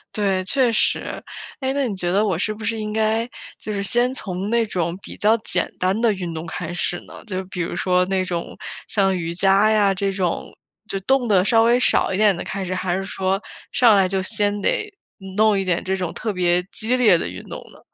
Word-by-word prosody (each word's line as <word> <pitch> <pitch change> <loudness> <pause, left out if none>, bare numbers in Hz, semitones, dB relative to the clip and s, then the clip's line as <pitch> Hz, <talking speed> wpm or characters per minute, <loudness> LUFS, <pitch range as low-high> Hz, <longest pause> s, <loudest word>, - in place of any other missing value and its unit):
对， 195 -3 +1
确 255 +1 +2
实。 220 - 0 0.4
诶， 265 +1 0
那 280 -2 0
你 200 - -3
觉 175 -1 -2
得 205 +3 +3
我 190 -6 0
是 215 +4 -1
不 220 - -10
是 225 +1 -1
应 215 0 -4
该 220 +1 +1 0.3
就 215 - -5
是 200 - -2
先 240 +5 +2
从 190 -6 -5
那 235 0 +3
种 170 -3 -2
比 - - -10
较 215 +2 +4
简 185 -4 -1
单 185 +4 +1
的 230 -2 +3
运 180 -3 -5
动 160 +1 -5
开 165 0 -5
始 175 +1 -2
呢？ - - -12
就 190 -3 -3
比 180 -1 -5
如 170 - -3
说 180 0 +2
那 190 0 0
种 175 -2 -4 0.3
像 195 -2 +2
瑜 170 0 -3
伽 195 +4 +4
呀 205 -2 +4
这 195 +1 0
种， 185 -3 -2 0.3
就 195 - -3
动 260 +3 +2
得 190 -3 +4
稍 225 +1 +4
微 240 +2 +4
少 250 - +2
一 185 - -1
点 205 -4 +4
的 - - -4
开 195 -1 -4
始， 185 0 -3
还 185 -1 -1
是 195 - -2
说 195 0 -1 0.3
上 240 -6 +5
来 190 -1 +4
就 190 0 -1
先 205 0 -1
得 425 - -1 0.4
弄 215 -1 +4
一 190 - -2
点 180 -2 0
这 190 0 -1
种 180 -3 -3
特 220 -3 -3
别 180 -1 +2
激 230 +3 0
烈 215 -9 +5
的 - - -3
运 - - -7
动 - - -6
呢？ - - -17
195 Hz, 250 characters per minute, -22 LUFS, 185-220 Hz, 0.4 s, 上